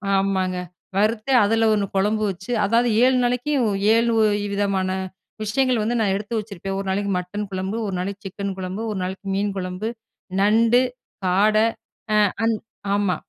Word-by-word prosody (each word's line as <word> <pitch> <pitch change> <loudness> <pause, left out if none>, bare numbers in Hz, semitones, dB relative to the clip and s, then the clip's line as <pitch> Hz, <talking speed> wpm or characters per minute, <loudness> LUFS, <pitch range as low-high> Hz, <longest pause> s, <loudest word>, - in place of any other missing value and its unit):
ஆமாங்க. 190 -2 +1 0.4
வறுத்து 215 +4 +1
அதுல 225 +2 +3
ஒண்ணு 205 -1 +1
கொழம்பு 210 +3 +1
வச்சு, 190 +5 -8
அதாவது 235 +3 +3
7 255 0 +4
நாளைக்கும், 250 +1 +1 0.3
7 230 +1 +3 0.4
விதமான 195 -2 0 0.5
விஷயங்கள் 250 +2 +1
வந்து, 235 +3 0
நான் 200 -3 +2
எடுத்து 210 +3 -3
வச்சிருப்பேன். 195 -2 -5
ஒரு 195 - -4
நாளைக்கு 200 +1 0
மட்டன் 205 +4 -5
குழம்பு. 190 +3 -3
ஒரு 195 - -3
நாளைக்கு 200 +3 -4
சிக்கன் 200 0 -4
குழம்பு. 185 +3 -4
ஒரு 200 - -3
நாளைக்கு 190 +2 -5
மீன் 200 0 0
குழம்பு. 185 +3 -3 0.5
நண்டு, 230 +4 +4 0.4
காடை, 215 +4 +4 0.5
அ - - +5 0.3
அந் 225 -1 +2 0.4
ஆமா. 200 -3 +1
205 Hz, 150 wpm, -22 LUFS, 190-225 Hz, 0.5 s, அ